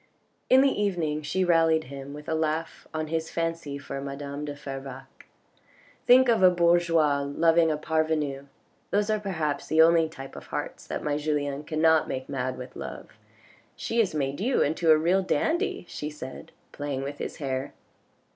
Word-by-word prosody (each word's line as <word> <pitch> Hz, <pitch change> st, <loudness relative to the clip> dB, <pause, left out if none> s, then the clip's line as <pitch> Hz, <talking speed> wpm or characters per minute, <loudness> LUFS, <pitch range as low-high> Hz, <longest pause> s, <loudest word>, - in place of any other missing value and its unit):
In 260 Hz, +1 st, +7 dB
the 270 Hz, -6 st, +2 dB
evening 165 Hz, -7 st, 0 dB
she 185 Hz, +5 st, 0 dB
rallied 165 Hz, -2 st, +3 dB
him 140 Hz, 0 st, -8 dB
with 150 Hz, +1 st, -10 dB
a -, -, -1 dB
laugh 160 Hz, +1 st, -2 dB
on 155 Hz, 0 st, -2 dB
his 160 Hz, 0 st, -2 dB
fancy 165 Hz, -4 st, -3 dB
for 140 Hz, -1 st, -6 dB
madame 140 Hz, +1 st, -5 dB
de 145 Hz, -1 st, -5 dB
Fervaques. 135 Hz, -1 st, -9 dB, 0.8 s
"Think 255 Hz, +1 st, +7 dB
of 230 Hz, -4 st, +3 dB
a 185 Hz, -, +8 dB
bourgeois 170 Hz, -4 st, +3 dB
loving 165 Hz, +4 st, +3 dB
a 155 Hz, -, 0 dB
parvenu, 155 Hz, -3 st, -1 dB, 0.4 s
those 205 Hz, +1 st, +1 dB
are 215 Hz, -, +1 dB
perhaps 160 Hz, -8 st, -2 dB
the 160 Hz, -, +1 dB
only 165 Hz, -1 st, +4 dB
type 135 Hz, -4 st, -10 dB
of -, -, -10 dB
hearts -, -, -5 dB
that -, -, -4 dB
my 145 Hz, -1 st, 0 dB
Julien 145 Hz, -1 st, -2 dB
cannot 160 Hz, 0 st, +3 dB
make 130 Hz, 0 st, -4 dB
mad 130 Hz, -2 st, -3 dB
with 125 Hz, 0 st, -9 dB
love. -, -, -7 dB, 0.7 s
She 230 Hz, -, -2 dB
has 200 Hz, -8 st, +2 dB
made 140 Hz, -1 st, -1 dB
you 250 Hz, +6 st, +2 dB
into 160 Hz, +3 st, 0 dB
a 155 Hz, -, +8 dB
real 175 Hz, +5 st, +2 dB
dandy," 330 Hz, -, 0 dB
she 150 Hz, -, -5 dB
said 130 Hz, -4 st, -9 dB, 0.2 s
playing 145 Hz, -2 st, -4 dB
with 140 Hz, +1 st, -6 dB
his -, -, -4 dB
hair. 135 Hz, -1 st, -3 dB
155 Hz, 175 wpm, -27 LUFS, 140-170 Hz, 0.8 s, a